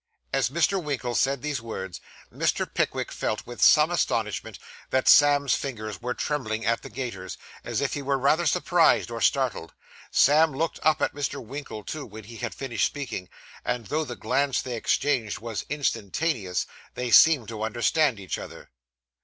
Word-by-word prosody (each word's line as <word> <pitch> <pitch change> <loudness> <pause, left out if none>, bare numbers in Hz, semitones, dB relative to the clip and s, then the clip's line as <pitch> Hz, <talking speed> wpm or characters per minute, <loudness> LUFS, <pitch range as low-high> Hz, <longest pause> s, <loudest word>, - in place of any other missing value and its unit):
As - - +2
Mr. 170 +6 +1
Winkle 130 -5 -2
said 135 +1 +1
these 145 -5 -2
words, 95 -6 -6 0.3
Mr. - - 0
Pickwick - - -2
felt, - - -3
with - - -9
some - - +6
astonishment, - - -1 0.3
that 130 0 +1
Sam's 145 -1 +6
fingers 110 -6 -4
were 125 +1 -3
trembling 115 -7 -2
at 115 0 +1
the - - -9
gaiters, 115 -6 -6 0.3
as 120 +2 -2
if 140 - -1
he 145 - -3
were 135 0 0
rather 155 +6 +2
surprised 175 -5 +3
or 115 -1 -5
startled. 130 -11 0 0.3
Sam 155 +2 +4
looked 160 +4 -2
up 155 0 +2
at - - +1
Mr. 145 -1 -3
Winkle, 125 -3 -7
too, 155 +5 -6
when 110 +1 -10
he 115 +3 -11
had 120 -1 -4
finished 125 -5 0
speaking; 130 -10 -6 0.3
and 125 -2 -2
though 155 +8 -1
the 125 -5 -6
glance 130 +4 0
they 125 -2 -4
exchanged 115 -1 0
was 115 -1 -5
instantaneous, 115 - -1 0.3
they 125 -1 -3
seemed 150 -4 +7
to 110 -2 -6
understand 120 +3 +1
each 95 -2 -4
other. - - -10
130 Hz, 170 wpm, -26 LUFS, 115-145 Hz, 0.3 s, seemed